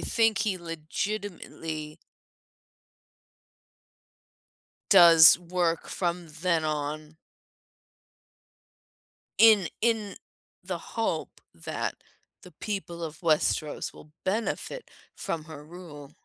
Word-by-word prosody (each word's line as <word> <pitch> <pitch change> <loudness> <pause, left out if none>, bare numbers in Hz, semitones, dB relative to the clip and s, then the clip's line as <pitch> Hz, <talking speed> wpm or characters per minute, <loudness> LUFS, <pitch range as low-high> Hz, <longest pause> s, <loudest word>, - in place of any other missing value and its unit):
think 225 -1 +2
he 195 -4 0
legitimately 165 -2 -5 2.9
does 170 -4 +9
work 175 -1 -1
from 175 -1 -3
then 170 -3 +1
on 150 0 -4 2.2
in 215 -5 +7
in 220 -3 0 0.5
the - - -4
hope - - -4
that - - -4 0.5
the - - -13
people 190 -5 -5
of 155 -1 -7
Westeros 155 -2 0
will 150 - -15
benefit 220 - -3 0.3
from 160 -2 -4
her 155 -2 -10
rule. 150 -4 -11
170 Hz, 80 wpm, -27 LUFS, 155-195 Hz, 2.9 s, does